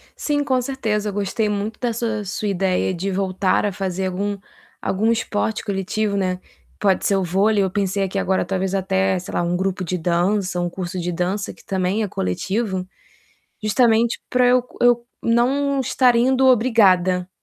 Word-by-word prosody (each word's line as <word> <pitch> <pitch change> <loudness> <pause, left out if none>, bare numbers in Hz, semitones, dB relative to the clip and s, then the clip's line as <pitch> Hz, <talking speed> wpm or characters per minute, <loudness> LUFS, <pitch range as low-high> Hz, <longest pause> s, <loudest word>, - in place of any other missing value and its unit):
Sim, 290 -1 -1
com 260 -3 +1
certeza. 220 -5 -2
Gostei 205 +2 -1
muito 210 +1 -3
da 240 -2 -1
sua 225 -2 -2
sua 200 +2 -3
ideia 190 -1 0
de 190 +3 -3
voltar 190 0 0
a 205 - 0
fazer 190 -1 -3
algum 200 +2 -2 0.4
algum 220 +4 +1
esporte 220 -1 -1
coletivo, 200 +1 -1
né. 185 -2 -1 0.4
Pode 195 -2 +2
ser 200 - +3
o 195 - +1
vôlei. 200 +4 +2
Eu 190 - -1
pensei 200 0 0
aqui 195 +1 -2
agora, 190 -1 0
talvez 190 0 -1
até, 190 0 +1
sei 180 - -7
lá, - - +1
um 175 +1 0
grupo 190 0 -1
de 180 +1 -2
dança, 180 +2 0
um 175 - -1
curso 185 +1 -5
de 175 0 -2
dança, 185 +4 -2
que - - -21
também 190 +3 0
é - - -1
coletivo, 190 - -2 0.8
justamente 225 +2 +3
para 250 0 +3
eu 250 0 +4
co 250 - -19
eu 240 -1 +4 0.2
não 270 +4 +2
estar 250 -1 +3
indo 260 +2 +3
obrigada, 190 -8 +3
200 Hz, 175 wpm, -21 LUFS, 185-225 Hz, 0.8 s, eu